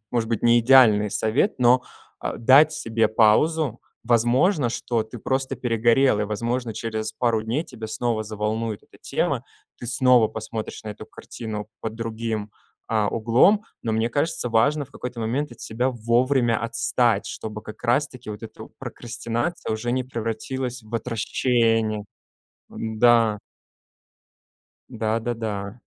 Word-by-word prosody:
может 115 -2 -1
быть, 115 -3 -1
не 120 0 +5
идеальный 115 -4 +6
совет, 120 - +1
но, 125 0 +5 0.4
а, - - -4
дать 140 +6 +6
себе 115 -7 0
паузу. 120 +5 +3 0.2
Возможно, 120 - +3
что 115 -1 -1
ты 110 +2 -10
просто 130 +3 -2
перегорел, 115 0 +2
и - - +1
возможно, 115 +3 -2
через 110 -1 -3
пару 115 -1 0
дней 120 +9 -2
тебя 110 -7 -8
снова 110 0 -1
заволнует 110 +1 -3
эта - - -21
тема, - - -1 0.3
ты 120 - -7
снова 125 -1 +4
посмотришь 110 0 -6
на - - -6
эту 105 +1 -8
картину 110 -2 -7
под 110 -1 -4
другим, 115 -2 -4 0.4
а, 110 -2 +1
углом, 120 - +3 0.2
но 115 - -1
мне 110 +1 +1
кажется, 145 -1 0
важно 140 +6 +2
в 135 - -21
какой-то 125 -3 -7
момент 125 +5 -2
от 120 - -15
себя 120 +4 -1
вовремя 120 0 +1
отстать, 115 -1 +1
чтобы 105 -1 -6
как 110 - -11
раз 140 +5 +2
таки 125 -5 -13
вот 105 +1 -8
эту 110 - -10
прокрастинация 120 +5 -4
уже 115 +2 -2
не 130 0 0
превратилась 120 +1 -4
в 110 +2 -11
отращение. 115 -2 0 0.7
Н-да. 110 -1 +3 1.5
Да-да-да. 110 -2 -3
115 Hz, 140 wpm, -24 LUFS, 110-125 Hz, 1.5 s, идеальный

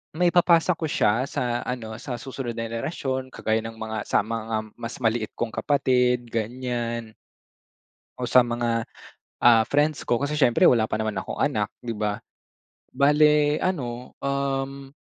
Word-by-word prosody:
maipapasa 175 0 +4
ko 165 -2 -2
siya 125 0 +1
sa 125 -4 -1
ano, 115 -3 -5
sa 125 -3 -5
susunod 120 -1 -6
na 115 - -3
henerasyon 130 +1 -3
kagaya 110 -3 -1
ng 115 0 -7
mga 110 0 -5
sa - - +2
mga 110 -1 -3
mas 115 0 -5
maliit 110 -1 0
kong 115 -1 -2
kapatid, 125 -1 +2
ganyan. 120 0 -3 1.1
O - - -4
sa 125 - +6
mga, 120 -1 -1 0.5
ah, 115 -2 +6
friends 145 +5 +1
ko 120 - +1
kasi 145 +2 -2
syempre 130 -6 +4
wala 110 -3 +4
pa - - -1
naman 110 -1 -2
akong - - -5
anak, - - 0
'di 115 -2 -5
ba? 105 -1 -2 0.8
Bale 150 +1 +4
ano, 125 -9 -3
um. 140 0 -2
120 Hz, 150 wpm, -25 LUFS, 115-140 Hz, 1.1 s, sa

